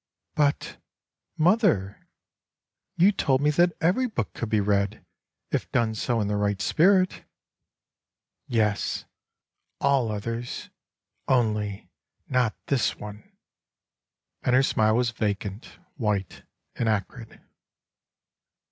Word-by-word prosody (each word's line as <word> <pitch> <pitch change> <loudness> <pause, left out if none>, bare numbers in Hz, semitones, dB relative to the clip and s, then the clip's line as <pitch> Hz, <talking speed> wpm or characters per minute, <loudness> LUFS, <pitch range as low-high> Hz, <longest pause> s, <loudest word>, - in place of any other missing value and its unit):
"But, 145 -1 0 0.6
mother, 160 - +2 0.9
you 185 +4 +6
told 135 -9 +1
me 150 +1 +3
that 175 +3 +3
every 195 +11 +2
book 160 - -3
could 115 - -4
be 110 - +2
read, 100 +1 0 0.5
if - - -2
done 115 -2 +1
so 115 +2 -1
in 105 - 0
the 105 - -1
right 100 -1 0
spirit. 185 - +3 0.4
'* - - -63
" - - -63
Yes, 105 -3 0 0.7
all 135 -5 +2
others, 115 +3 -5 0.6
only 105 -5 0 0.4
not 125 -4 +1
this 135 -4 +1
one 105 0 -10 0.6
;" - - -62
and 125 - +2
her 130 - +5
smile 110 -4 +2
was 120 -1 +1
vacant, 105 -1 -4 0.2
white 105 -6 -2 0.3
and 115 - 0
acrid. 110 +3 -3
115 Hz, 115 wpm, -26 LUFS, 105-140 Hz, 0.9 s, you